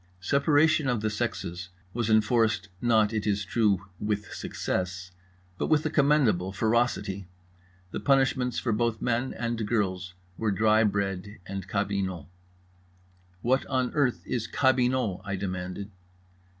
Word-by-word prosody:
Separation 145 - +3
of 120 -4 0
the 110 0 0
sexes 90 -3 -3 0.2
was 120 -1 -1
enforced, 110 -1 +2
not, 110 -2 +3
it 105 -1 -1
is 100 0 0
true, 100 -2 +1
with 105 0 -2
success, 90 0 -3 0.5
but - - 0
with 155 -1 +2
a 155 - 0
commendable 140 - +3
ferocity. 105 -3 0 0.6
The - - -3
punishments 135 -3 +2
for 120 - 0
both 115 0 0
men 120 +2 0
and 115 -1 -2
girls 95 -5 -1 0.2
were 110 - +1
dry 110 +2 +4
bread 100 0 -2
and 95 -1 -6
cabinot. 95 -5 -2 1.2
"What 130 +3 +2
on 130 -2 0
earth 135 -5 +1
is 120 -3 -2
cabinot?" 125 -6 +2
I 100 -1 -3
demanded. 95 +1 -4
110 Hz, 130 wpm, -27 LUFS, 95-125 Hz, 1.2 s, dry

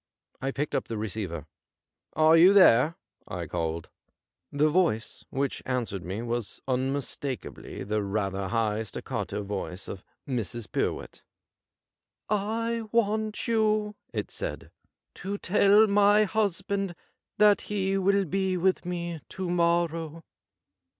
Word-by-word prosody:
I 135 - -1
picked 140 +2 -3
up - - -1
the 115 - -4
receiver. 100 -7 -4 0.4
' - - -64 0.3
Are 155 +1 +5
you 175 +4 +8
there 165 -5 +6 0.2
}' - - -41
I - - -3
called. 80 -1 -3 0.6
The 145 +2 +3
voice 155 - 0
which 135 0 -2
answered 120 -7 -2
me 95 +6 -4
was 120 -3 -3
unmistakably 135 0 -3
the 105 +2 -1
rather 100 -1 -2
high 110 0 0
staccato 105 0 -4
voice 95 -2 -5
of 95 - -7 0.2
Mrs. 120 -3 -3
Pyrwhit. - - -2 0.8
' - - -60 0.4
I 230 0 -1
want 215 -1 0
you,' 215 -2 +2 0.2
it - - -4
said, - - -5 0.2
' - - -61
to 200 +1 -3
tell 205 +2 +5
my 205 0 +5
husband 200 -2 -1 0.4
that 210 -1 +5
he 195 -2 0
will 195 +1 +2
be 190 +2 0
with 185 +1 +1
me 170 -2 -4
to 185 -2 -3
morrow.' 170 -2 0
165 Hz, 130 wpm, -28 LUFS, -, 0.8 s, you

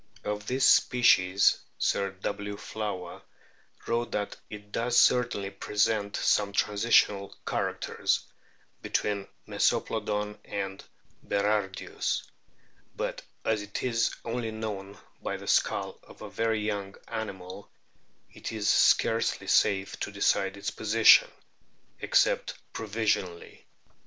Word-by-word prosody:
Of 105 0 -4
this 130 +1 +3
species 100 -6 +4 0.2
Sir 100 0 +1
W. 100 +2 -5
Flower 100 -5 -5 0.6
wrote 120 0 -1
that 105 -1 -2
"it 105 -1 -10
does 120 +2 +2
certainly 120 -6 +2
present 105 0 0
some 100 -1 +2
transitional 105 -1 +2
characters - - -1 0.6
(between 100 -1 -1 0.2
Mesoplodoii 105 0 0
and 95 -1 -5 0.4
Berardius]; 100 -2 -1 0.7
but - - -3 0.2
as 110 -1 +1
it 105 0 -5
is 115 -3 +1
only 115 0 -2
known 105 -3 -6 0.2
by - - -3
the - - -11
skull - - 0
of - - -14
a - - -8
very 115 -1 0
young 100 -2 -3
animal 100 -2 -6 0.6
it - - -6
is 110 -2 -3
scarcely 115 +2 +3
safe 100 -1 +2
to - - -3
decide 100 -1 +1
its 100 - -3
position, 110 +1 +6 0.7
except - - +2 0.2
provisionally." 105 -5 -2
105 Hz, 105 wpm, -28 LUFS, 100-110 Hz, 0.7 s, position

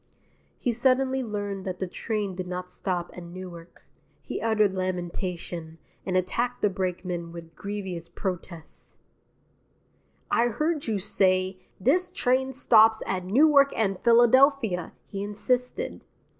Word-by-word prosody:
He 245 - 0
suddenly 260 +2 +2
learned 205 -4 -4
that 185 -1 -3
the 190 - -2
train 205 +1 -3
did 185 0 -5
not 180 0 -5
stop 175 -3 -3
at 180 - -8
Newark. 175 -1 -10 0.4
He - - -5
uttered 215 -3 +2
lamentation, 175 -2 -4 0.3
and 185 -1 +1
attacked 235 +7 -1
the 210 - +4
brakeman 180 -2 -3
with 165 -1 -10
grievous 190 -4 -5
protest. 175 -3 -6 1.3
"I 235 - +4
heard 300 +5 -1
you 220 -2 0
say, 185 -1 +1 0.2
This 350 - +2
train 265 -6 +1
stops 225 -4 +5
at 185 -1 -2
Newark 280 +6 +5
and 195 -4 0
Philadelphia," 240 - +4
he 195 - -6
insisted. 245 +5 -2
195 Hz, 125 wpm, -26 LUFS, 180-240 Hz, 1.3 s, stops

